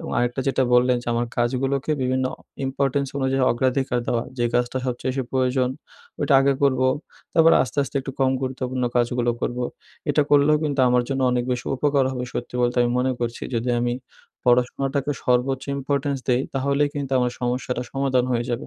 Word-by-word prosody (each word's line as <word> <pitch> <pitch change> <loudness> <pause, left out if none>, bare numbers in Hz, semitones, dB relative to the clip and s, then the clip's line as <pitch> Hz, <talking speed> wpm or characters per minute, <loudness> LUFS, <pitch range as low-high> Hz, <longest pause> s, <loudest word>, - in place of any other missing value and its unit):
এবং - - -6
আরেকটা 120 +2 0
যেটা 135 - +2
বললেন 125 0 +4
যে - - -16
আমার 120 +1 0
কাজগুলোকে 135 +4 0
বিভিন্ন 130 +1 0 0.4
ইম্পোর্টেন্স 140 +1 0
অনুযায়ী 135 0 +1
অগ্রাধিকার 130 +1 0
দেওয়া 115 -1 0 0.2
যে 120 - +1
কাজটা 120 +1 +1
সবচেয়ে 125 +1 -2
বেশি 135 0 -1
প্রয়োজন 130 -1 +1 0.5
ওইটা 140 - +2
আগে 140 0 +3
করবো, 130 -2 +3 0.5
তারপর 165 0 +6
আস্তে, 130 +2 -5
আস্তে 140 - -5
একটু 135 0 -6
কম 130 -1 +4
গুরুত্বপূর্ণ 130 -1 -2
কাজগুলো 120 0 +1
করব 120 - -2 0.5
এটা 150 0 +3
করলেও 145 +1 +5
কিন্তু 140 -2 0
আমার 125 0 +3
জন্য 135 -1 -1
অনেক 120 -1 0
বেশি 125 - -4
উপকার 140 -1 +2
হবে 125 -1 -3
সত্যি 120 - -5
বলতে 120 +1 +1
আমি 120 - +1
মনে 130 +1 +1
করছি 120 0 -3
যদি 120 +2 0
আমি 120 0 0 0.5
পড়াশোনাটাকে 135 +3 +1
সর্বোচ্চ 130 +2 +1
ইম্পোর্টেন্স 140 0 -1
দেই, 125 0 +3
তাহলেই 140 +2 +1
কিন্তু 140 -2 -4
আমার 125 -1 +1
সমস্যাটা 125 0 -2
সমাধান 135 -2 +1
হয়ে 120 0 0
যাবে 120 0 -3
130 Hz, 175 wpm, -23 LUFS, 125-135 Hz, 0.5 s, তারপর